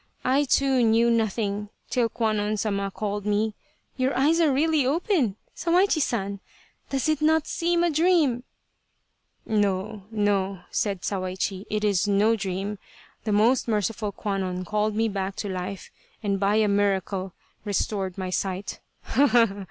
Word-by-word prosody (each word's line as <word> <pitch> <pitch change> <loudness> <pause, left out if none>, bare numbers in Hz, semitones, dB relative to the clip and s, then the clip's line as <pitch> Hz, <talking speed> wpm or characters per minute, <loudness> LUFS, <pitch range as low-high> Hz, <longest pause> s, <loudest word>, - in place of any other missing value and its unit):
I, 270 +3 +3
too, 270 -1 +3
knew 230 +1 +4
nothing 210 -2 -1 0.2
till 240 -2 +2
Kwannon 215 -2 0
Sama 200 -1 -1
called 205 0 -3
me. 210 +1 0 0.4
Your 260 +1 0
eyes 305 +5 +3
are 315 -3 +4
really 305 +2 +2
open, 285 - +1 0.2
Sawaichi 350 -1 +2
San! 200 -6 -1 0.5
Does 270 +1 -1
it 310 -1 +1
not 315 0 +3
seem 345 0 0
a 345 - +2
dream! 315 -6 +3 0.4
" - - -48
" - - -47
No, 205 -1 -1
no," 200 -3 0
said 200 -4 -1
Sawaichi, 190 0 -2
" - - -25
it 215 0 -1
is 205 -1 +2
no 205 +3 +3
dream. 195 0 -3 0.5
The 215 - 0
most 230 +6 +3
merciful 210 -1 -1
Kwannon 190 -3 -3
called 210 +2 0
me 225 +1 +2
back 195 -2 -3
to 205 - -4
life 185 +1 -5 0.3
and 200 -2 0
by 200 +1 +2
a 215 -1 +3
miracle 195 -2 0 0.3
restored 200 -2 -2
my 185 -1 -3
sight. 190 +1 -3
210 Hz, 150 wpm, -25 LUFS, 195-250 Hz, 0.5 s, knew